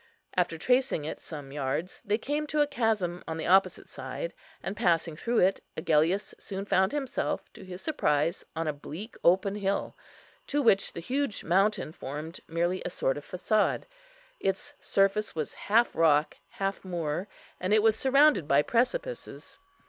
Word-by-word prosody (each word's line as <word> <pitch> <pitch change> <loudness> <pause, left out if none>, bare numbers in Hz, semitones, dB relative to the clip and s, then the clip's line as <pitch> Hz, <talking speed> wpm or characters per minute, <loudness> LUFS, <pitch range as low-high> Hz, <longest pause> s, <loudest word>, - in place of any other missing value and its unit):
After 175 -2 +1
tracing 250 - +1
it 155 - -5
some 145 -4 -8
yards, 145 +5 -3
they 205 +1 +1
came 295 +5 -2
to 300 0 +1
a - - +5
chasm 220 -10 0
on 160 - -3
the 160 - -3
opposite 190 +2 +3
side; - - -6 0.3
and, 195 - -3
passing 165 -4 +1
through 235 +9 -1
it, 190 +2 +4 0.2
Agellius 160 +6 +2
soon 195 -1 -5
found 190 -1 +3
himself, 280 -2 -2
to 215 - -12
his 185 0 -9
surprise, 165 - +1
on 165 0 -2
a 155 - 0
bleak 165 +9 -8
open 190 +3 +4
hill, 200 -1 -1 0.5
to 290 - 0
which 215 -8 +3
the 170 - -6
huge 265 +3 -1
mountain 195 -1 +2
formed 150 +3 -7
merely 170 +3 0
a - - -2
sort 135 -6 0
of 145 - -8
façade. 210 +3 +1 0.6
Its 195 0 -2
surface 195 +1 +1
was 155 -2 -3
half 230 +4 +2
rock, 155 -2 +3
half 195 0 -3
moor, 175 -1 -2 0.3
and 185 +2 -2
it 215 0 +5
was 220 -1 +5
surrounded 275 - +4
by 140 +1 +4
precipices. 370 - -2
190 Hz, 165 wpm, -29 LUFS, 165-220 Hz, 0.6 s, a